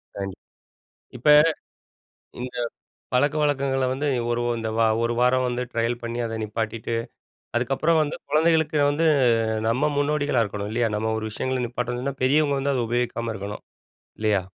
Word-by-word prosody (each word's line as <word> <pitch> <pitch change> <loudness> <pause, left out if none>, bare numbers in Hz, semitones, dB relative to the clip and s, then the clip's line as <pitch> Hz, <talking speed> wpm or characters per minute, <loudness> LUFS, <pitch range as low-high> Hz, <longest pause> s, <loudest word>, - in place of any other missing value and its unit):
கண்டிப், 95 -1 -6 0.8
இப்ப 125 +5 -1 1.1
இந்த 125 0 -6 0.6
பழக்கவழக்கங்களை 140 -1 +1
வந்து, 145 +3 -2 0.2
ஒரு 120 0 0 0.2
இந்த 110 -1 -3
ஓ - - +5 0.2
ஒரு 115 - +1
வாரம் 130 +1 +3
வந்து 125 0 -2
ட்ரையல் 115 +1 -1
பண்ணி 120 +1 -3
அதை 115 -1 -4
நிப்பாட்டிட்டு. 110 +1 -3 0.6
அதுக்கப்புறம் 135 +7 +2
வந்து 150 0 -2
குழந்தைகளுக்கு 160 0 +2
வந்து 160 +3 +1 0.6
நம்ம 140 +6 +1
முன்னோடிகளா 145 -4 +1
இருக்கணும் 105 0 -5
இல்லையா? 120 0 +1
நம்ம 110 +1 -1
ஒரு 110 - -4
விஷயங்களை 130 +3 -2
நிப்பாட்டணும்ன்னா, 125 +3 -3
பெரியவங்க 140 +1 +3
வந்து 140 +1 0
அதை 125 - 0
உபயோகிக்காம 120 -1 -1
இருக்கணும். 100 0 -6 0.6
இல்லையா? 105 -3 +2
125 Hz, 135 wpm, -24 LUFS, 115-145 Hz, 1.1 s, ஓ